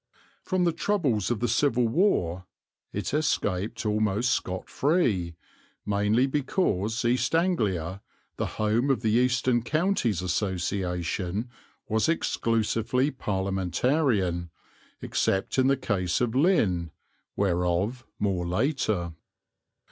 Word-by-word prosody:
From 185 Hz, -1 st, 0 dB
the 170 Hz, -, +3 dB
troubles 160 Hz, -, 0 dB
of 120 Hz, -3 st, -1 dB
the 120 Hz, -, +1 dB
Civil 120 Hz, 0 st, +2 dB
War 95 Hz, -, +1 dB, 0.4 s
it -, -, -4 dB
escaped 115 Hz, -8 st, -1 dB
almost 105 Hz, +2 st, +1 dB
scot 95 Hz, 0 st, -3 dB
free, 115 Hz, -, +1 dB, 0.5 s
mainly 105 Hz, +4 st, +2 dB
because 130 Hz, -, 0 dB
East 125 Hz, +5 st, +1 dB
Anglia, 100 Hz, -, 0 dB, 0.4 s
the -, -, -1 dB
home 110 Hz, +5 st, +1 dB
of 135 Hz, -, +2 dB
the 110 Hz, -, +2 dB
Eastern 125 Hz, +1 st, +2 dB
Counties 145 Hz, -, 0 dB
Association, 90 Hz, +2 st, -2 dB, 0.4 s
was 110 Hz, +3 st, +1 dB
exclusively 115 Hz, -2 st, 0 dB
Parliamentarian, 95 Hz, -, 0 dB, 0.5 s
except 95 Hz, +7 st, 0 dB
in 130 Hz, -, +4 dB
the 135 Hz, 0 st, +3 dB
case 95 Hz, -8 st, -1 dB
of 120 Hz, -2 st, 0 dB
Lynn, 115 Hz, -, +2 dB, 0.5 s
whereof 95 Hz, +5 st, 0 dB
more 95 Hz, -4 st, -1 dB
later. 100 Hz, -, 0 dB
110 Hz, 105 wpm, -27 LUFS, 95-130 Hz, 0.5 s, in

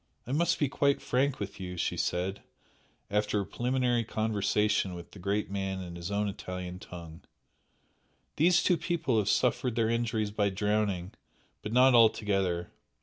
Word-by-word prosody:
"I 125 Hz, -, -6 dB
must 165 Hz, +4 st, +2 dB
be 145 Hz, -, +1 dB
quite 140 Hz, +1 st, +1 dB
frank 135 Hz, +2 st, 0 dB
with 100 Hz, -1 st, -6 dB
you," 90 Hz, -1 st, -6 dB
she -, -, -1 dB
said, 95 Hz, +3 st, -1 dB, 0.7 s
after 105 Hz, 0 st, +1 dB
a 100 Hz, -, -2 dB
preliminary 125 Hz, 0 st, 0 dB
conversation 105 Hz, -3 st, 0 dB
with 85 Hz, -1 st, -10 dB
the 100 Hz, -, -12 dB
great 100 Hz, +2 st, -1 dB
man 95 Hz, -1 st, -2 dB
in 85 Hz, -1 st, -8 dB
his 85 Hz, +1 st, -5 dB
own 105 Hz, +1 st, 0 dB
Italian 90 Hz, -2 st, -6 dB
tongue 85 Hz, -3 st, -10 dB, 1.2 s
"These 170 Hz, +2 st, +4 dB
two 180 Hz, -, +3 dB
people 155 Hz, -11 st, 0 dB
have 105 Hz, -1 st, 0 dB
suffered 125 Hz, -1 st, +1 dB
their 115 Hz, -1 st, +2 dB
injuries 110 Hz, -3 st, 0 dB
by 105 Hz, -1 st, +1 dB
drowning 100 Hz, -2 st, -1 dB, 0.5 s
but 105 Hz, -, -5 dB
not 130 Hz, +2 st, +6 dB
altogether. 100 Hz, -6 st, +3 dB
105 Hz, 155 wpm, -30 LUFS, 95-120 Hz, 1.2 s, not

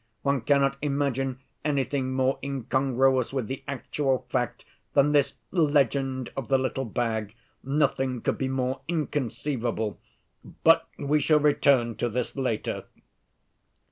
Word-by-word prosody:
One 140 Hz, -2 st, +1 dB
cannot 140 Hz, +2 st, +2 dB
imagine 135 Hz, -2 st, -1 dB, 0.2 s
anything 140 Hz, -2 st, 0 dB
more 130 Hz, +1 st, +1 dB
incongruous 130 Hz, -1 st, +1 dB
with 135 Hz, -4 st, -1 dB
the 130 Hz, +4 st, -5 dB
actual 135 Hz, -1 st, -1 dB
fact 125 Hz, -2 st, -1 dB, 0.3 s
than 140 Hz, +1 st, +4 dB
this 145 Hz, -2 st, +2 dB, 0.2 s
legend 140 Hz, -5 st, +1 dB
of 135 Hz, -, -4 dB
the 135 Hz, -, +4 dB
little 130 Hz, 0 st, -1 dB
bag. 110 Hz, -2 st, -2 dB, 0.3 s
Nothing 135 Hz, -2 st, +1 dB
could -, -, -1 dB
be 135 Hz, -, 0 dB
more 130 Hz, 0 st, -1 dB
inconceivable. 130 Hz, -8 st, -2 dB, 0.6 s
But -, -, +5 dB
we 145 Hz, +1 st, +1 dB
shall 150 Hz, +2 st, +4 dB
return 135 Hz, -5 st, +3 dB
to 120 Hz, -, 0 dB
that 125 Hz, +3 st, -3 dB
later." 130 Hz, -5 st, -2 dB
135 Hz, 125 wpm, -27 LUFS, 125-140 Hz, 0.6 s, But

